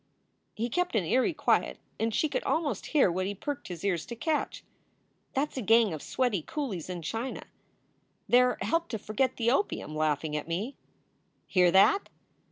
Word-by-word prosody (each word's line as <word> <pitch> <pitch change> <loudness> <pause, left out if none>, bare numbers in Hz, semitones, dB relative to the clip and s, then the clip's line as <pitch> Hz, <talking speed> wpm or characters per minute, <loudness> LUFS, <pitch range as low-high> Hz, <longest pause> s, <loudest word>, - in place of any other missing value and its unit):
He 230 +2 -1
kept 360 +4 -1
an 200 -6 +2
eerie 255 - +2
quiet - - +1 0.2
and 225 +1 +1
she 310 - +1
could - - -2
almost 290 - -1
hear 280 - +4
what 185 +2 -1
he 205 - -3
perked 285 +8 -5
his 175 -2 -7
ears 175 -5 +1
to 235 - -6
catch. 305 +6 -2 0.7
"That 285 +3 +1
s - - -12
a - - -1
gang 225 -3 +4
of 155 - -5
sweaty 245 -9 0
coolies 200 - -4
in 175 -2 -5
China. 225 +10 -4 0.8
They 245 +1 +6
re 250 0 +2
helped 335 +1 0
to 225 - -2
forget 225 +5 -1
the 235 0 +2
opium, 260 - -1
laughing 155 0 0
at 150 - -3
me. 200 +11 -3 0.7
Hear 180 -2 +4
that! 195 - +4
225 Hz, 180 wpm, -29 LUFS, 180-265 Hz, 0.8 s, They